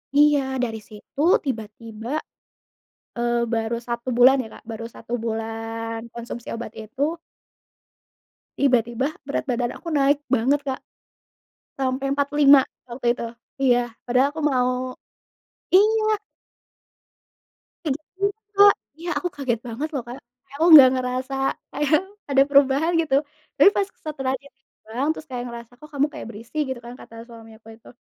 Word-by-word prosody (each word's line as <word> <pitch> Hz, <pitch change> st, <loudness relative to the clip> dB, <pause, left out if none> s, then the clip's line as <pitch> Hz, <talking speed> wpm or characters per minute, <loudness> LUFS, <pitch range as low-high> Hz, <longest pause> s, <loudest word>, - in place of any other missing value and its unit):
Iya 295 Hz, 0 st, +6 dB, 0.2 s
dari 225 Hz, -2 st, -2 dB
situ 215 Hz, +6 st, -8 dB, 0.2 s
tiba-tiba, 225 Hz, -1 st, -6 dB, 1.1 s
eee, 240 Hz, 0 st, 0 dB
baru 225 Hz, +1 st, -1 dB
1 235 Hz, +1 st, -4 dB
bulan 255 Hz, +2 st, +7 dB
ya -, -, -8 dB
Kak, -, -, -13 dB
baru 225 Hz, 0 st, -6 dB
1 230 Hz, -, -11 dB
bulan 225 Hz, 0 st, -4 dB, 0.2 s
konsumsi 235 Hz, 0 st, -7 dB
obat 230 Hz, -1 st, -6 dB
itu 220 Hz, +5 st, -11 dB, 1.6 s
tiba-tiba 250 Hz, +1 st, +1 dB, 0.2 s
berat 280 Hz, -, -1 dB
badan 240 Hz, -1 st, -1 dB
aku 340 Hz, -, -7 dB
naik 285 Hz, 0 st, +2 dB
banget 270 Hz, +3 st, +2 dB
Kak. 265 Hz, -2 st, -3 dB, 1.0 s
Sampai 270 Hz, +1 st, -1 dB
45 285 Hz, -1 st, +5 dB, 0.2 s
waktu 240 Hz, 0 st, -1 dB
itu, -, -, -4 dB, 0.3 s
iya, 245 Hz, -2 st, +3 dB, 0.2 s
padahal 255 Hz, +3 st, +3 dB
aku 315 Hz, +2 st, -6 dB
mau 255 Hz, -2 st, 0 dB, 0.8 s
iya! 430 Hz, +2 st, +4 dB, 1.7 s
Kayak 290 Hz, -5 st, 0 dB, 0.2 s
gitu, 400 Hz, +1 st, +1 dB, 0.3 s
Kak, 405 Hz, 0 st, +9 dB, 0.2 s
iya 340 Hz, +2 st, -6 dB
aku 355 Hz, -, -2 dB
kaget 260 Hz, -5 st, -1 dB
banget 240 Hz, +7 st, -3 dB
loh 275 Hz, -, -1 dB
Kak, 245 Hz, +2 st, -7 dB, 0.3 s
kayak 280 Hz, -, -11 dB
aku 330 Hz, -, +4 dB
nggak 275 Hz, -4 st, +11 dB
ngerasa 255 Hz, +1 st, -2 dB, 0.4 s
kayak 295 Hz, 0 st, 0 dB, 0.4 s
ada 270 Hz, -1 st, +5 dB
perubahan 280 Hz, +3 st, +4 dB
gitu, 300 Hz, -4 st, 0 dB, 0.4 s
tapi 295 Hz, +7 st, +8 dB
pas 400 Hz, -, +1 dB, 0.2 s
setelahnya 270 Hz, -2 st, -3 dB
ditimbang 260 Hz, 0 st, -6 dB
terus 315 Hz, -, -10 dB
kayak 250 Hz, -1 st, -4 dB
ngerasa, 235 Hz, 0 st, -9 dB
"Kok 305 Hz, -, -13 dB
kamu 285 Hz, +1 st, +3 dB
kayak -, -, -7 dB
berisi?" 230 Hz, +6 st, -10 dB
gitu 260 Hz, -2 st, -4 dB
kan 240 Hz, -, -8 dB
kata 230 Hz, -, -13 dB
suami 225 Hz, -2 st, -13 dB
aku 220 Hz, -, -21 dB
itu, 230 Hz, -, -17 dB
255 Hz, 140 wpm, -23 LUFS, 235-285 Hz, 1.7 s, nggak